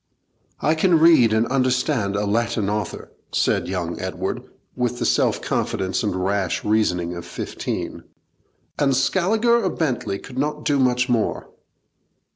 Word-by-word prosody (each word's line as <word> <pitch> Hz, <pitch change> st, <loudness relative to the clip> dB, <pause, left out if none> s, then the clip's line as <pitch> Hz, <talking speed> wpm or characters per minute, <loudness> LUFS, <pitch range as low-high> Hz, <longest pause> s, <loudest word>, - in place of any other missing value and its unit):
'I 155 Hz, -, +3 dB
can 165 Hz, +1 st, +3 dB
read 160 Hz, -9 st, +6 dB
and 110 Hz, +1 st, +2 dB
understand 130 Hz, -5 st, +1 dB
a 105 Hz, 0 st, 0 dB
Latin 110 Hz, -1 st, 0 dB
author,' 105 Hz, -3 st, -4 dB, 0.2 s
said -, -, +1 dB
young 90 Hz, -2 st, -3 dB
Edward, -, -, -3 dB, 0.3 s
with 125 Hz, -1 st, -1 dB
the 120 Hz, -, -2 dB
self -, -, +1 dB
confidence 95 Hz, +2 st, -1 dB
and 105 Hz, -5 st, -1 dB
rash 95 Hz, 0 st, -1 dB
reasoning 90 Hz, -5 st, +1 dB
of 85 Hz, -, -6 dB
fifteen, -, -, -5 dB, 0.7 s
'and 135 Hz, -2 st, +3 dB
Scaliger 215 Hz, -, +2 dB
or 190 Hz, -, +1 dB
Bentley 125 Hz, -, -2 dB
could 130 Hz, +5 st, -8 dB
not 150 Hz, +1 st, -2 dB
do 145 Hz, -1 st, +2 dB
much 125 Hz, -1 st, +2 dB
more.' 120 Hz, -4 st, -1 dB
120 Hz, 140 wpm, -22 LUFS, 100-145 Hz, 0.7 s, read